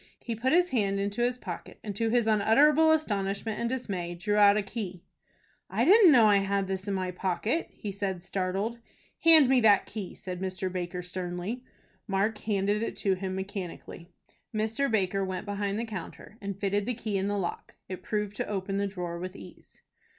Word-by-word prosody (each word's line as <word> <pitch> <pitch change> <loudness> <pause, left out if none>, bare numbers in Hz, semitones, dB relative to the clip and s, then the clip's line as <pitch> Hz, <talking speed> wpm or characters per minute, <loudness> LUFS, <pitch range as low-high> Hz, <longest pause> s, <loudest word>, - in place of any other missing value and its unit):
He 235 - -3
put 250 +4 0
his 355 +2 +4
hand 200 -6 0
into 200 +3 -2
his 245 +1 +1
pocket, 180 -8 -8
and, 205 -2 -5
to 225 +2 0
his 240 0 +2
unutterable 280 +9 +5
astonishment 210 -7 -1
and 235 - -1
dismay, 190 -9 -3
drew 190 +4 -1
out 205 0 +6
a 210 - 0
key. 195 -4 -6 0.7
"I - - +1
didn't 395 -2 +8
know 240 -5 +7
I 205 -1 +6
had 195 0 0
this 190 +1 -4
in 200 - 0
my 185 -1 -2
pocket," 190 - -1
he 205 - -6
said, 190 -3 -3
startled. 195 +5 -2 0.4
"Hand 320 -4 +7
me 260 -1 +4
that 210 -3 +5
key," 205 -4 -7
said 185 -1 -7
Mr. 190 0 -3
Baker, 180 0 -4
sternly. 180 +6 -4 0.4
Mark 205 +2 0
handed 205 0 0
it 230 - -3
to 195 - +1
him 185 0 -3
mechanically. 190 -3 -6 0.4
Mr. 220 +5 0
Baker 195 -3 +1
went 185 -1 -4
behind 205 0 -2
the 230 - -2
counter, 210 0 -8
and 200 -1 -5
fitted 200 0 0
the 250 - -1
key 220 -3 -4
in 195 0 0
the 205 0 -1
lock. 180 -3 -4
It 185 - -6
proved 210 -1 -2
to - - -2
open 195 -1 -2
the 200 0 0
drawer 175 -3 -5
with 185 +2 -6
ease. - - -14
200 Hz, 195 wpm, -28 LUFS, 190-225 Hz, 0.7 s, didn't